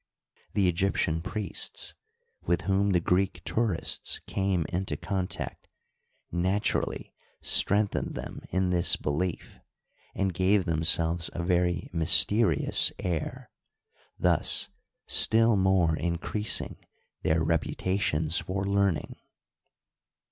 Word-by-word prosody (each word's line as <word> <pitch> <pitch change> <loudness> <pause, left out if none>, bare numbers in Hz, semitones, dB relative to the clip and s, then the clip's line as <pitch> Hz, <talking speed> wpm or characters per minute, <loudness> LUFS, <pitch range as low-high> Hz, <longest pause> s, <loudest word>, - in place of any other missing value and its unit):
The 100 -3 +3
Egyptian 85 -3 0
priests 95 0 -1 0.5
with 85 0 0
whom 100 +1 +1
the 90 -3 +3
Greek 95 +3 0
tourists 110 -7 -1
came 95 -4 -1
into 95 +2 -2
contact 95 -3 -4 0.6
naturally 95 +4 -1 0.3
strengthened 105 +1 +2
them - - -7
in 95 0 0
this 85 -1 +3
belief, 80 +4 -4 0.6
and 95 -2 -1
gave 95 +2 +2
them 80 -2 -1
selves 85 0 +2
a 85 - -4
very 90 0 0
mysterious 85 +2 +4
air, 85 -4 -4 0.7
thus - - +1 0.4
still 115 0 +4
more 95 -4 +2
increasing 85 +6 -1 0.4
their 80 +1 +1
reputations 80 0 -1
for 95 +1 -4
learning. 100 -3 0
90 Hz, 95 wpm, -27 LUFS, 85-100 Hz, 0.7 s, mysterious